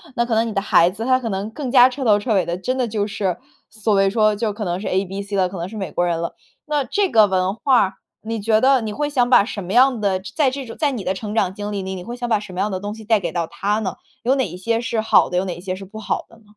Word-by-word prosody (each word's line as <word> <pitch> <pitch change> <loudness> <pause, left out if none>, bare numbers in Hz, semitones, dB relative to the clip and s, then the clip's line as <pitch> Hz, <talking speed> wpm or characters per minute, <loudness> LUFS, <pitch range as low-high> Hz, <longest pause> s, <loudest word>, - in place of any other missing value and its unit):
那 235 -2 +1
可 235 - -2
能 225 +1 +2
你 220 - -4
的 195 - 0
孩 175 -4 +4
子， 205 +5 -6
他 255 +1 +3
可 245 - -5
能 200 0 -3
更 265 +2 -5
加 250 0 +7
彻 260 +1 -5
头 210 -3 +5
彻 210 +2 -1
尾 190 -3 +2
的 170 +1 -3
真 255 +8 -2
的 250 -2 0
就 210 -2 -1
是 200 -2 -2 0.3
所 220 0 -1
谓 195 -1 +4
说 215 0 +3
就 225 +2 -1
是 210 - -2
可 210 +1 -5
能 175 -2 -2
是 205 - -5
ABC 195 +2 -2
了， 185 -2 +2
可 190 - -8
能 170 +1 -4
是 215 - -10
美 195 -5 -4
国 175 - 0
人 170 -1 -1
了。 170 - -4 0.3
那 295 -2 0
这 400 +4 0
个 215 -2 +6
文 185 0 0
化， 240 -5 +2 0.3
你 225 +1 -4
觉 215 +1 +2
得， 265 0 +5
你 215 -2 -4
会 295 +5 -2
想 250 -4 +1
把 245 - +6
什 205 -1 -5
么 180 +2 -5
样 255 -1 +5
的 195 -3 0 0.2
在 285 -4 +4
这 275 +1 -5
种 230 - -9
在 295 -3 +1
你 240 -7 -4
的 185 - 0
成 210 +2 -6
长 185 -4 +1
经 205 +1 -5
历 200 -1 -3
里， 190 0 -5
你 180 - -7
会 235 +6 -6
想 245 -1 -4
把 220 -2 +3
什 205 -3 -10
么 180 - -5
样 210 - 0
的 185 - -2
东 205 +2 -5
西 220 - -11
带 220 0 +3
给 - - -3
到 170 -1 -1
他 205 +5 -1
呢？ 190 -5 -3 0.3
有 255 +3 +3
哪 265 -2 0
一 - - -9
些 225 +5 -1
是 235 -2 -1
好 220 - +4
的， 180 - -1
有 185 - +2
哪 180 -2 -4
一 - - -10
些 185 +1 -4
是 195 - -9
不 215 +3 -10
好 - - -2
的 230 - -18
呢？ 225 - -23
210 Hz, 355 characters per minute, -21 LUFS, 190-235 Hz, 0.3 s, 加